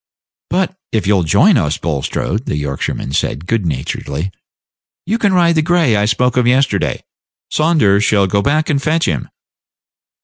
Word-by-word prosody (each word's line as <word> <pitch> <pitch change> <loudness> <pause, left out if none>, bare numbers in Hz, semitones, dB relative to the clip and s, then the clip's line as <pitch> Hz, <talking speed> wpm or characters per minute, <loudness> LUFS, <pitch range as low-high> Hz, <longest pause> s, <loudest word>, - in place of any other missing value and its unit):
"But 185 +1 -1 0.2
if 110 -3 -1
you'll 100 -1 +3
join 80 - +4
us, 75 +1 0
Bulstrode," 85 - -3
the 75 - -2
Yorkshireman 70 -2 -4
said, 75 +2 -2
good 105 -2 -1
naturedly, 70 +4 -4 0.7
"you 220 +6 -1
can 205 -3 +2
ride 175 -2 +3
the 160 - +2
gray 165 -7 +2
I 105 0 +2
spoke 125 +4 +1
of 125 -1 +3
yesterday. 130 +2 +1 0.5
Saunders 150 -11 +2
shall 100 -2 +3
go 100 +2 0
back 155 +8 +1
and 140 -2 0
fetch 160 +3 +1
him." 75 -7 -2
110 Hz, 160 wpm, -16 LUFS, -, 0.7 s, join